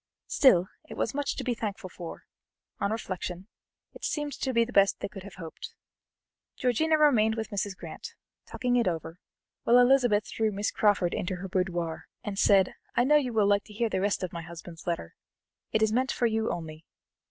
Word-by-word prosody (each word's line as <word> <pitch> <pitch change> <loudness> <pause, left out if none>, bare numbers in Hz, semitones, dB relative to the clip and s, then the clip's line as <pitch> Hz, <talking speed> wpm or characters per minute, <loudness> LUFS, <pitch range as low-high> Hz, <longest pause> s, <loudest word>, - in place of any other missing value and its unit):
Still 185 -11 +5 0.2
it - - -8
was - - -1
much 285 0 -1
to - - -4
be 250 - 0
thankful 215 -3 -4
for; 175 -2 -9 0.6
on 200 - 0
reflection, 185 -3 -4 0.5
it - - -14
seemed 295 -2 -2
to 265 - -2
be 235 -2 +3
the 245 - -10
best 200 0 +4
they - - -3
could 195 0 -10
have 195 -1 -11
hoped. 165 -3 -9 0.8
Georgiana 310 +6 +2
remained 230 -8 +4
with 225 -1 -4
Mrs. 200 -1 -2
Grant, - - -9 0.3
talking 245 -1 0
it 235 - +2
over, 165 0 -3 0.4
while 240 - +5
Elizabeth 245 -4 +4
drew 220 -1 0
Miss 205 +1 -1
Crawford 200 -5 +2
into 185 +1 -2
her 185 +2 -6
boudoir, 175 -3 -2 0.2
and 200 -1 -4
said: 195 -2 +4 0.2
"I 240 - +4
know 300 +4 +5
you 265 -4 0
will 220 -3 +3
like 200 0 +3
to 210 - -13
hear 230 +2 0
the 190 - -1
rest 205 0 0
of 185 - -4
my 170 - -4
husband's 165 0 -10
letter. 170 - -3 0.6
It 220 - +2
is 220 0 +2
meant 260 +3 +1
for 245 - 0
you 220 -1 +1
only. 160 -2 -6
205 Hz, 200 wpm, -28 LUFS, 185-240 Hz, 0.8 s, Still